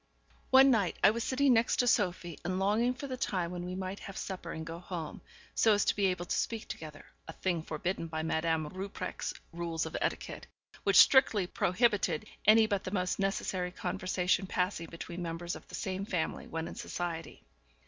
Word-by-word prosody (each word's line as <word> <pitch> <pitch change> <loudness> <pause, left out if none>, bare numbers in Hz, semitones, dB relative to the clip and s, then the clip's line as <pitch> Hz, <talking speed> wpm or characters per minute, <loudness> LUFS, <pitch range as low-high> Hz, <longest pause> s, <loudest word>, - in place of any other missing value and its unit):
One 265 +1 +8
night 205 -7 +1
I - - +8
was 230 +1 -2
sitting 270 0 +3
next 230 +1 +3
to 245 - +2
Sophie, 180 -7 +1
and 185 +1 -1
longing 215 +6 +2
for 270 - -6
the 260 -2 -4
time 180 -8 -1
when 175 -1 -4
we 180 +1 -4
might 190 +1 -4
have 195 - -8
supper 180 -3 -5
and 160 0 -5
go 165 +1 -6
home, 175 -3 -6 0.3
so 220 - +4
as 205 - +1
to - - +2
be 200 -1 +3
able 180 -2 -1
to - - -1
speak 225 -2 -2
together, 155 -1 -8 0.2
a 160 - -7
thing 175 -2 -1
forbidden 165 +2 -3
by 160 0 -3
Madame 160 -1 0
Rupprecht's 185 0 -5 0.2
rules 165 -1 -2
of 160 - -6
etiquette, - - -3 0.3
which 200 - +2
strictly 215 -1 +7
prohibited 210 +4 +1 0.2
any 220 +1 +7
but 200 -3 -1
the - - -4
most 185 -1 -1
necessary 195 -2 -1
conversation 185 +1 -1
passing 180 -2 -1
between 170 +1 -7
members 170 +1 -4
of - - -12
the - - -8
same 190 0 -3
family 180 -6 -2
when 165 0 -4
in - - -7
society. 170 -2 -5
185 Hz, 190 wpm, -31 LUFS, 170-205 Hz, 0.3 s, One